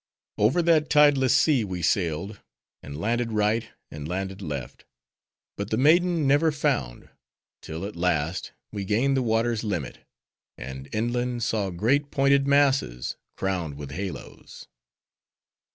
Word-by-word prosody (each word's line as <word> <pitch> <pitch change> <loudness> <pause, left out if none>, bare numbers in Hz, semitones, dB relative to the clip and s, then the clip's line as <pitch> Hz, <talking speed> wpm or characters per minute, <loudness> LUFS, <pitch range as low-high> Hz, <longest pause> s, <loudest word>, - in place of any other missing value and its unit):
Over 125 +12 +3
that 160 -2 +3
tideless 145 -4 +5
sea 140 -7 +3
we 90 -4 -5
sailed; 90 +4 -1 0.4
and 70 0 -8
landed 115 +4 -1
right, 110 +2 +1 0.2
and 75 -1 -7
landed 95 +3 -4
left; 70 -7 -6 0.7
but 100 0 -4
the 110 - 0
maiden 165 +4 +3
never 145 +4 +4
found; 140 - -2 0.5
till, 80 +4 -6
at 105 - -7
last, 85 -1 -1 0.2
we 100 -2 -4
gained 120 +8 +1
the 135 - +2
water's 115 -1 0
limit; 90 - -3 0.6
and 65 +2 -8
inland 120 +2 -1
saw 105 -4 0
great 125 +11 +1
pointed 140 0 +3
masses, 135 - +2 0.2
crowned 90 -6 -2
with 70 -2 -8
halos. 95 +4 -8
110 Hz, 130 wpm, -25 LUFS, 90-135 Hz, 0.7 s, tideless